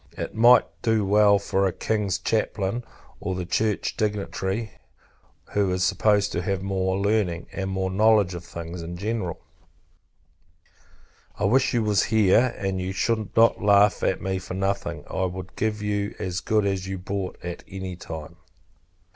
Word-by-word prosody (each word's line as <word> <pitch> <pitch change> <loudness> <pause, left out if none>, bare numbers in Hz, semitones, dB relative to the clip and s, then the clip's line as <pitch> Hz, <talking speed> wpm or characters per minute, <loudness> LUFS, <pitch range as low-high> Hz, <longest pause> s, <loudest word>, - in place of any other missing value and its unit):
It - - -4
might 120 +3 +6 0.2
do 110 -3 +2
well 105 +1 +5
enough 100 -1 +2
for 95 0 +1
a - - 0
King's 100 0 -1
chaplain; 110 +1 -1 0.4
or 95 -1 -3
a 90 - -3
church 105 +3 0
dignitary, 105 0 -2 0.8
who 100 -2 +1
is 90 0 0
supposed 105 +2 +2
to - - -1
have 95 -3 -2
more 95 -1 0
learning, 100 -4 0
and 95 -1 -3
more 95 0 -1
knowledge 105 -1 +4
of 85 -1 -6
things 85 0 -7
in 85 +1 -6
general. 100 -3 -3 2.0
I - - -4
wish 130 +5 +3
you 115 - +2
was 105 -2 +2
here, 110 +3 +3
and 95 -1 -2
you 95 +1 -3
should 110 +1 -1
not 115 +1 +5
laugh 100 0 +4
at 95 - 0
me 95 0 -1
for 90 0 -7
nothing. 100 +1 -2
I 95 - -1
would 95 0 -6
give 105 -1 -1
you 105 0 -2
as 90 -1 -3
good 105 +2 +1
as 95 -1 -1
you 95 0 -3
brought, 95 0 -4
at 90 -1 -6
any 95 -1 -6
time. 80 -1 -8
100 Hz, 165 wpm, -25 LUFS, 95-105 Hz, 2.0 s, might